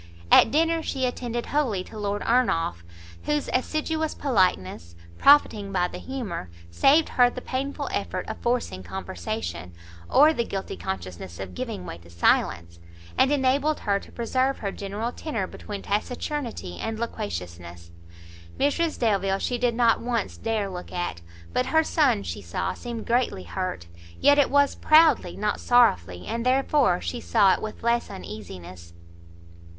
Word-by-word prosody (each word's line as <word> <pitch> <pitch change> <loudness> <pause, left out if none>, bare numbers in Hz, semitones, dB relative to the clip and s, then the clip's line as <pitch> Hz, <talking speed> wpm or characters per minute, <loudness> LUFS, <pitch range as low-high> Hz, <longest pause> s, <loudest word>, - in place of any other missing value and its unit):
At - - +8
dinner 330 +5 +2
she 265 -4 -2
attended 240 -1 -3
wholly 250 -11 0
to 220 - -13
Lord 205 0 -2
Ernolf, 165 - +1 0.4
whose 295 -1 -1
assiduous 315 +4 -1
politeness, 135 - 0 0.2
profiting 215 -8 +5
by 180 -2 +1
the - - -7
humour, 220 - -5 0.2
saved 290 - +4
her 245 -1 +4
the 250 - -7
painful 265 +2 -3
effort - - -3
of - - -6
forcing 235 - -1
conversation, 90 -1 -5 0.4
or 300 +3 +6
the 235 - 0
guilty 195 -4 -5
consciousness 90 -1 -6
of 95 -1 -6
giving 90 +1 -5
way 85 - -7
to 85 0 -17
silence, 85 0 +1 0.4
and 265 - +3
enabled 285 +2 +1
her 200 -1 +1
to - - -15
preserve 255 +3 0
her 200 -2 -3
general 205 +4 -4
tenor 230 -9 -3
between 200 +2 -8
taciturnity 230 - -3
and 225 0 -3
loquaciousness. 85 - -6 0.7
Mrs 310 +4 +1
Delvile 195 -4 +1
she 245 +4 -2
did 240 -1 +1
not 235 -1 +4
once 235 -3 -2
dare 220 -3 -1
look 180 -2 -7
at; 175 - -3 0.3
but 125 - +1
her 320 0 +3
son, 295 - +2
she 90 +2 -5
saw, 85 0 -3
seemed 235 -2 -6
greatly 240 - 0
hurt; 90 - -4 0.3
yet 285 0 +5
it 285 - +4
was 285 0 +3
proudly, 310 - +4
not 210 0 -1
sorrowfully, 90 - +3
and 230 +1 -3
therefore 270 - +3
she 85 -1 -4
saw 185 - +4
it - - -2
with 215 0 -7
less 235 0 +1
uneasiness. 90 - -9
215 Hz, 150 wpm, -25 LUFS, -, 0.7 s, At